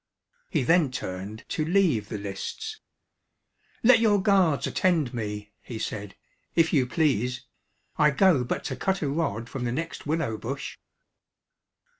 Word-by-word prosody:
He 155 -8 +1
then 165 +2 +4
turned 100 -3 -6
to 155 - -1
leave 160 - +2
the 105 - -3
lists. 100 - -5 1.0
"Let 230 0 +7
your 215 -3 +4
guards 190 -7 +3
attend 165 -9 +1
me," 105 -2 -4
he 115 - -7
said, 105 -3 -5 0.4
"if 165 -1 +3
you 130 -5 +3
please 125 -4 0 0.5
I 150 - +6
go 150 -2 +4
but 120 - -3
to - - -3
cut 190 -2 -1
a - - 0
rod 135 -7 -1
from 125 0 -5
the 120 - -1
next 160 +3 -4
willow 150 -8 0
bush." 135 +4 -5
140 Hz, 145 wpm, -27 LUFS, 115-170 Hz, 1.0 s, Let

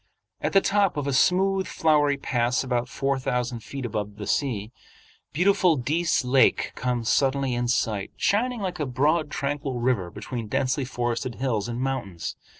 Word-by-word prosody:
At - - -1
the 195 - +6
top 200 -4 +2
of 145 - -1
a 140 - -1
smooth, 190 +6 +3
flowery 150 -3 +2
pass 125 -2 0
about 125 -1 -1
four 140 0 -1
thousand 125 -1 -2
feet 135 +3 -7
above 105 -2 -3
the 105 -1 -7
sea, 110 -3 -1 0.6
beautiful 180 +1 +3
Dease 150 +3 0
Lake 130 +1 +3
comes 125 -2 -2
suddenly 135 0 +2
in 120 0 -1
sight, 110 -4 0
shining 240 +3 +1
like 180 -3 -3
a 150 - -1
broad 150 +5 +1
tranquil 140 -3 -3
river 120 -8 0
between 110 +4 -6
densely 135 +3 0
forested 120 -1 -2
hills 115 -3 -1
and 120 0 -4
mountains. 120 -11 -3
130 Hz, 160 wpm, -25 LUFS, 120-150 Hz, 0.6 s, the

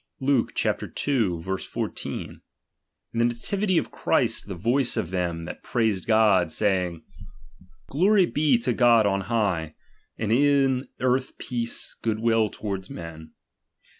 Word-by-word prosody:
Luke 135 -2 +1
ii. - - +3 0.7
14: 95 +1 -4 0.7
In 115 - -2
the 120 - +4
nativity 185 - 0
of - - -1
Christ, - - 0
the 100 - -5
voice 120 +8 +1
of 85 - -2
them 85 -3 -2
that - - -8
praised 110 -6 -1
God, 105 -6 +4
saying, 90 -3 0 0.8
Glory 190 +6 +4
be 150 -6 +2
to 120 +1 -1
God 120 -2 +5
on 100 -1 +1
high, 95 -7 -1 0.4
and 110 -1 -2
in 135 0 +3
earth 130 +1 0
peace, 120 -2 -4
good 110 -2 0
will 115 -1 +2
towards 95 -3 -5
men. 80 -2 -9
115 Hz, 130 wpm, -25 LUFS, 95-130 Hz, 0.8 s, God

